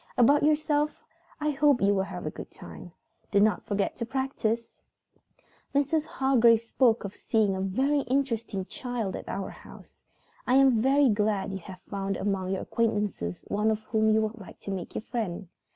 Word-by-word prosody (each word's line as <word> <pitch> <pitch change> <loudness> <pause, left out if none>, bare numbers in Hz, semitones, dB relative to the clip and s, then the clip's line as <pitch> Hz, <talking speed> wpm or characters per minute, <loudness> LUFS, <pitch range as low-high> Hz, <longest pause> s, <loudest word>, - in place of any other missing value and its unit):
"About 280 +4 +5
yourself, 300 0 +1 0.4
I 300 0 0
hope 290 -2 +3
you 200 +1 +3
will 195 - +1
have 190 - -6
a - - -2
good - - -9
time. - - -11 0.4
Do 200 - +3
not 215 +1 +2
forget 205 -2 -1
to 235 - -3
practice. 235 -4 -2 0.9
Mrs. 295 +2 +1
Hargrave 240 -4 +4
spoke 230 0 +2
of 200 -1 -6
seeing 210 -4 +1
a 190 - -3
very 265 +10 +1
interesting 235 -7 -1
child 235 -4 -4
at - - -7
our 195 - -4
house. - - -15 0.5
I 250 - +4
am 265 -4 +5
very 275 +3 +4
glad 205 -2 0
you 190 - -4
have 185 0 -11
found 195 -1 -3
among 195 -2 -1
your 190 0 -2
acquaintances 210 - -1
one 210 +2 +1 0.2
whom 220 -1 +3
you 220 0 +4
would 220 +1 -4
like 190 -5 -12
to 200 - -5
make 185 -3 -5
your - - -3
friend. 205 -7 -4
220 Hz, 175 wpm, -28 LUFS, 200-265 Hz, 0.9 s, About